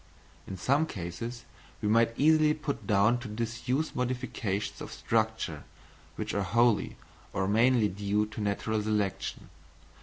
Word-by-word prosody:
In 95 - -6
some 140 - +2
cases 115 - -6 0.3
we - - -2
might 115 +2 +3
easily 155 +1 +5
put 140 -9 -4
down 105 +3 +4
to 120 - -7
disuse 120 +6 -2
modifications 125 -5 -2
of - - -7
structure - - -1 0.5
which - - -4
are 100 - 0
wholly, 115 +2 +2 0.4
or 95 0 0
mainly 115 +2 +4
due 100 +2 0
to 110 0 -7
natural 105 +1 0
selection. 105 -2 -2
115 Hz, 130 wpm, -29 LUFS, 105-125 Hz, 0.5 s, easily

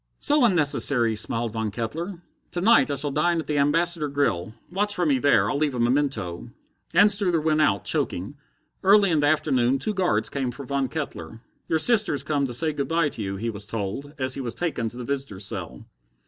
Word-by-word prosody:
"So 295 -2 +2
unnecessary," 145 - +3
smiled 115 +2 0
Von 110 -1 -2
Kettler. 165 - -5 0.3
"To 175 - -2
night 225 -2 +4
I 145 - -1
shall 140 +1 +1
dine 170 +4 +1
at 160 - -4
the 150 -1 -1
Ambassador 165 +2 +2
grill. 110 -9 -1 0.2
Watch 205 +3 0
for 175 - 0
me 140 -4 +2
there. 145 +2 +3
I'll 145 - -1
leave 150 -4 0
a - - -3
memento." 120 -7 -1 0.5
Anstruther 200 -3 +3
went 155 0 +1
out, 100 -10 +2
choking. 95 +11 -1 0.5
Early 200 0 +5
in 160 - +2
the 145 - +2
afternoon 135 -4 +2
two 215 +10 -3
guards 175 - 0
came 135 -3 -3
for 125 +3 -8
Von 140 0 -1
Kettler. 115 - -6 0.3
"Your 160 - +1
sister's 180 - +3
come 145 -2 -1
to 120 - -6
say 155 +4 0
good 140 -1 -3
by 165 -2 +1
to 115 - -7
you," 100 -1 -3
he 115 +4 -3
was 105 -1 -5
told, 115 +8 -5
as 130 -1 0
he 135 - -2
was 120 -3 -4
taken 155 -10 -2
to 120 - -13
the 125 - -6
visitors' 135 -8 -3
cell. - - -6
140 Hz, 205 wpm, -24 LUFS, 120-165 Hz, 0.5 s, Early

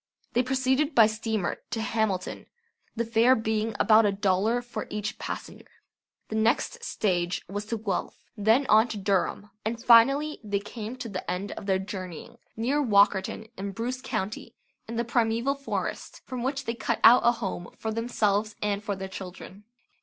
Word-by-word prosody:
They 245 - +4
proceeded 265 +3 +1
by 225 - +8
steamer 220 -3 -2
to 230 - -3
Hamilton, 220 -4 -2 0.5
the 235 0 -1
fare 230 +3 +4
being 220 -1 -1
about 220 0 +6
a 205 - +3
dollar 200 +4 +1
for 240 - -6
each 210 0 -4
passenger. - - -7 0.6
The 220 - -4
next 235 - +1
stage 180 - -1
was 205 +1 -4
to 230 +2 -3
Guelph; 205 -4 -3 0.2
then 225 +6 +3
on 220 0 +5
to 220 - -5
Durham, 200 +1 -1
and 225 +2 -2
finally 270 +6 +5
they 205 -1 -1
came 215 +3 -7
to 250 -2 -6
the 185 -2 -5
end 190 +3 -3
of 200 - -8
their 190 -1 +3
journeying 190 -3 -7 0.2
near 265 +6 +1
Walkerton 205 -2 +2
in 200 0 -4
Bruce 245 +5 -3
County 215 -5 -4 0.3
in 230 - -5
the 235 +1 0
primeval 235 +3 +1
forest, 275 0 -4
from 255 -2 -5
which 270 +2 -2
they 230 - -1
cut 235 -1 -2
out 240 +2 +9
a 240 - +5
home 190 -6 -5
for 220 - -3
themselves 215 -2 0
and 205 0 -1
for 205 -1 -2
their 190 0 -5
children. 190 +1 -9
220 Hz, 170 wpm, -27 LUFS, 200-235 Hz, 0.6 s, out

